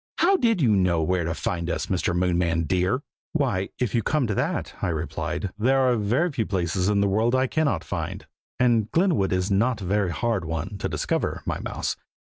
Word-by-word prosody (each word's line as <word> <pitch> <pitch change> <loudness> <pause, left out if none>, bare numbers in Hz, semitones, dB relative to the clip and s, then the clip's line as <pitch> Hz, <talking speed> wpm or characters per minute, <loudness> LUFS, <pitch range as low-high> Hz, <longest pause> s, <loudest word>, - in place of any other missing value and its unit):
How 380 +3 +4
did 230 - +2
you 110 -5 +4
know 90 -4 +2
where 90 +1 0
to 80 0 -2
find 85 -1 -2
us, - - -1
Mr. 90 -1 -1
Moonman, 85 -2 +1
dear?" 95 - 0 0.3
"Why, 120 -11 0
if 125 -5 -1
you 115 - +2
come 150 +3 +1
to 105 - -1
that," - - -2
I - - 0
replied, 85 +3 -3
"there 130 +5 +3
are 130 -2 +3
very 120 - +1
few 115 -6 -2
places 90 0 0
in 100 -1 +2
the 100 - +3
world 110 +5 +2
that 130 - +3
I - - +3
cannot 155 +2 0
find, - - -4 0.3
and 115 -4 +3
Glenwood 165 - +2
is 95 +2 0
not 115 +5 +2
a 95 - -6
very 100 0 +1
hard 115 +2 -1
one 80 +5 -4
to - - -2
discover, - - -2
my - - -2
mouse. - - -3
100 Hz, 210 wpm, -25 LUFS, 90-125 Hz, 0.3 s, How